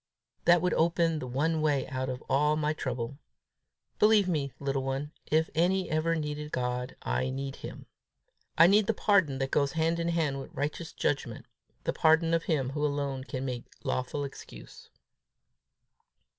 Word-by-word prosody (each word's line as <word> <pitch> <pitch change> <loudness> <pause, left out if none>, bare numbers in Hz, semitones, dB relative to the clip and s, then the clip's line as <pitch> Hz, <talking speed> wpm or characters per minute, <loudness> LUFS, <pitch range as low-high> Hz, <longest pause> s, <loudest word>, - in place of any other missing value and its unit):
That 175 0 +5
would 180 - +2
open 165 -1 +2
the 130 - -5
one 155 +6 0
way 145 -3 +1
out 130 0 -3
of 125 0 -5
all 150 +2 +3
my 155 0 0
trouble. 130 -1 -4 0.8
Believe 210 -2 +5
me, 145 -6 -1
little 135 -1 -1
one, 135 +2 -3 0.2
if 160 +1 +2
any 180 +3 +1
ever 160 +2 +1
needed 150 -1 -4
God, 125 0 -2
I 130 - 0
need 135 +1 -4
him. - - -9 0.7
I 165 - +9
need 205 +3 +5
the 225 - +1
pardon 190 -12 +3
that 135 0 -2
goes 140 -2 +2
hand 165 +1 +1
in 170 - -1
hand 160 -5 0
with 135 - -10
righteous 150 +4 -3
judgment, 125 -5 -2 0.4
the - - -1
pardon 160 +1 +4
of 165 0 +1
him 135 -5 0
who 150 +1 -2
alone 140 -2 -1
can 130 +1 -4
make 125 -2 -4 0.2
lawful 130 +3 -2
excuse." 135 - -10
150 Hz, 165 wpm, -29 LUFS, 135-165 Hz, 0.8 s, I